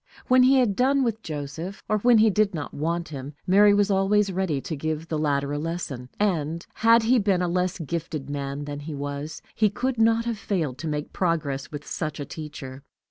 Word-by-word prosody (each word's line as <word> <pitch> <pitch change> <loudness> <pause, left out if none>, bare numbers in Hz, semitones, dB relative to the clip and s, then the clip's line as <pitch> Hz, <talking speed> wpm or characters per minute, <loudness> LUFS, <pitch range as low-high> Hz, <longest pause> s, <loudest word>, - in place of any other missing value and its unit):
When 255 0 +6
he 260 +2 +6
had 245 -7 +3
done 270 +3 +3
with 225 -2 -1
Joseph, 160 +3 -6
or 215 - +1
when 240 +2 +5
he 220 0 +5
did 205 -2 +2
not 150 - -5
want 170 +3 -2
him, 140 -1 -7
Mary 205 +3 +6
was 205 0 +3
always 195 +1 +3
ready 180 -6 -1
to 160 - -5
give 155 +2 -3
the 155 - -1
latter 140 -1 0
a 145 - -2
lesson; 150 -6 -4
and, 170 -5 0
had 230 +1 +5
he 245 +2 +4
been 195 -3 +2
a - - +1
less 180 +1 0
gifted 160 -3 -4
man 140 0 -4
than 145 0 -5
he 150 +1 -6
was, 145 +2 -5
he 215 -1 +3
could 250 +4 -2
not 225 +1 +3
have 230 -3 -2
failed 160 - -2
to 165 - -4
make 150 -1 -3
progress 155 -6 -1
with 145 0 -7
such 155 -3 -4
a 145 - -3
teacher. 140 -3 -8
170 Hz, 210 wpm, -25 LUFS, 145-210 Hz, -, When